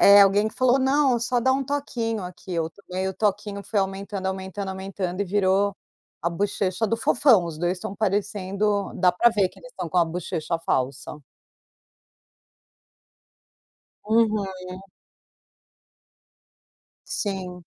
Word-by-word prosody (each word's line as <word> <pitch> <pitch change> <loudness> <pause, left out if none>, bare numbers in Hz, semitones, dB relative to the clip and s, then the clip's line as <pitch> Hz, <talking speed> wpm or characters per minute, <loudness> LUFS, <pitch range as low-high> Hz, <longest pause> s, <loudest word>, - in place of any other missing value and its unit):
Eh, 200 0 +9
alguém 205 +2 +4
que - - -14
falou 255 +1 +3
não, 270 -1 +3
só 240 +1 0
dar 260 +2 +3
um 270 0 0
toquinho 240 -7 -2
aqui, 180 +1 -8
eu 165 -1 -1
tomei 190 0 -4
o 190 - -4
toquinho 205 0 -1
foi 205 -3 0
aumentando, 195 0 -3
aumentando, 190 +1 -4
aumentando 190 -1 -4
e - - +2
virou 195 +1 +2 0.5
a 170 - +1
bochecha 200 +3 -1
do 230 - 0
fofão, 235 -5 +4
os 160 -2 -6
2 175 +1 +1
estão 195 - -6
parecendo 200 0 0
dá 180 -2 +4
pra 210 +7 +4
ver 200 -4 +2
que - - -19
eles - - -13
estão 175 - -5
com 180 - +1
a 170 - +5
bochecha 165 -1 -3
falsa. 135 0 -2 2.9
Uhum. 215 -2 +3 2.6
Sim. 185 -3 -4
200 Hz, 135 wpm, -24 LUFS, 185-220 Hz, 2.9 s, Eh